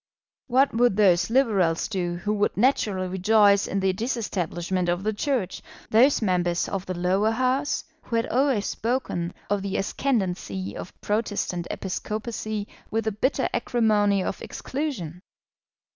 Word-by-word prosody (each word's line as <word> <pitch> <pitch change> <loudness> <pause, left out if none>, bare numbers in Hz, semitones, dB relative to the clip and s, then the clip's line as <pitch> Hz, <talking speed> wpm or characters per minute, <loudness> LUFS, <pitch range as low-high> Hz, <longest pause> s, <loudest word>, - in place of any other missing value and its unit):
What 265 +2 +3
would 235 -3 +3
those 180 -4 +4
Liberals 205 -10 +2
do 180 -4 -2
who 190 +5 -2
would 205 -1 0
naturally 205 -6 +2
rejoice 200 +2 +4
in 195 - -1
the 190 0 +2
disestablishment 185 -5 -2
of 175 +2 0
the 215 +1 0
Church, 225 -5 -1 0.3
those 240 +3 +5
members 175 -3 +1
of 195 -1 -4
the 185 -1 -3
Lower 190 +4 +2
House, 255 +5 0 0.2
who 230 - -4
had 230 - +2
always 255 -5 +1
spoken 225 -8 -2 0.2
of 205 -1 0
the 195 0 -2
ascendancy 180 - -2
of - - -9
Protestant 205 -5 -1
episcopacy 215 +2 -4 0.2
with 225 +1 -1
the 220 - 0
bitter 260 +6 0
acrimony 210 -5 +2
of - - -4
exclusion? 225 - -4
205 Hz, 140 wpm, -25 LUFS, 185-230 Hz, 0.3 s, those